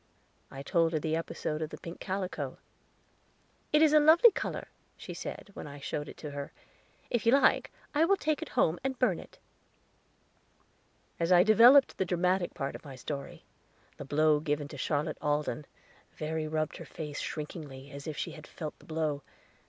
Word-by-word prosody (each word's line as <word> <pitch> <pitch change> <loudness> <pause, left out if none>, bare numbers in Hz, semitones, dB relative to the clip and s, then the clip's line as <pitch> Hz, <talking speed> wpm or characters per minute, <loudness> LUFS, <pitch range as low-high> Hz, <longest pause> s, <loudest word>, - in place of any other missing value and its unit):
I 135 +1 -8
told 165 +1 +2
her 155 - +1
the 160 +1 -1
episode 160 -1 -3
of 155 - -2
the - - -8
pink 170 +1 -9
calico. 190 -1 -3 1.1
"It 300 +1 +5
is 305 -1 +5
a 305 - +8
lovely 325 +10 +7
color," - - -4 0.3
she - - -8
said, 200 - -7
when - - -7
I 145 0 -9
showed 145 +1 -4
it - - -11
to 150 - -4
her. 140 0 -6 0.6
"If 240 - +1
you 235 - +6
like, 275 - +4 0.2
I 310 +2 +4
will 395 +3 +3
take 310 -4 0
it - - -5
home 160 +2 +3
and 265 -1 -2
burn 230 -10 +2
it." - - -13 1.8
As 170 +1 +1
I 175 0 +8
developed 240 +6 +7
the 190 - +2
dramatic 180 +1 0
part 140 -5 -3
of - - -9
my 140 -3 -9
story 140 +2 -6 0.5
the - - -6
blow 150 +2 +3
given 150 -1 -1
Charlotte 145 +1 -2
Alden, 150 0 -1 0.5
Verry 155 0 -3
rubbed 155 0 -2
her - - -9
face 150 -3 -6
shrinkingly, 145 -3 -6
as 140 +1 -8
if 155 - -4
she - - -3
had 155 -2 -11
felt 155 -3 -7
the - - -18
blow. 155 -3 -1
160 Hz, 180 wpm, -30 LUFS, 150-190 Hz, 1.8 s, a